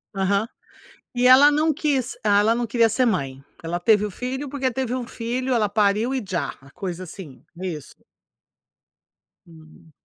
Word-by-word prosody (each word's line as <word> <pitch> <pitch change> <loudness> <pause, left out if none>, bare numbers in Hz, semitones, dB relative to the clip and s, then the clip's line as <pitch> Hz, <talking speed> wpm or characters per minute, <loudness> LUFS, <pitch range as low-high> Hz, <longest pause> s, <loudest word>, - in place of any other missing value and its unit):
Aham. 200 +3 +1 0.7
E 250 0 +3
ela 270 +3 +8
não 305 +1 +2
quis, 275 -4 -1
ah, 205 -1 +4
ela 220 +2 +3
não 240 0 -2
queria 230 0 +3
ser 255 +4 +1
mãe. 135 - -1 0.2
Ela 175 +2 -3
teve 210 +2 +3
o 210 - -5
filho 260 +7 -5
porque 265 -1 -1
teve 255 0 -2
um 250 -2 -3
filho, 255 +2 -3
ela 215 -4 +1
pariu 210 +4 +1
e 260 - -2
já 170 -7 -2
a 135 - -17
coisa 185 -2 -6
assim, 175 -5 -11 0.2
isso. 170 -6 -6 1.5
Hum. 160 -1 -18
220 Hz, 165 wpm, -23 LUFS, 185-255 Hz, 1.5 s, ela